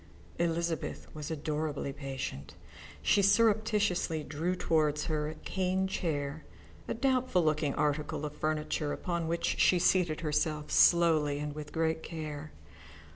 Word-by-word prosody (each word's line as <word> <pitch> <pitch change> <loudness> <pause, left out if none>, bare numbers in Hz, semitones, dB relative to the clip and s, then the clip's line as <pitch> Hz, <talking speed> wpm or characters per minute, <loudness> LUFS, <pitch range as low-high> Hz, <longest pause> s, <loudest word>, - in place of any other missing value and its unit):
Elizabeth 170 -1 -1
was 150 -1 -6
adorably 150 -2 -2
patient. 130 - -6 0.5
She 205 - +4
surreptitiously 205 -5 +2
drew 160 +5 -2
towards 150 -4 +1
her 150 -1 -1
a 155 - -7
cane 190 +2 -1
chair, 155 -5 -2 0.4
a - - -2
doubtful 255 -7 +2
looking 155 -2 +1
article 150 0 -1
of 150 - -6
furniture 155 -1 -1
upon 170 -2 -2
which 170 +1 -1
she 180 - +5
seated 175 -3 +2
herself 150 -1 -1
slowly 160 -4 +4
and 150 0 -4
with 150 0 -8
great 160 0 0
care. 155 -2 -6
155 Hz, 130 wpm, -31 LUFS, 150-175 Hz, 0.5 s, she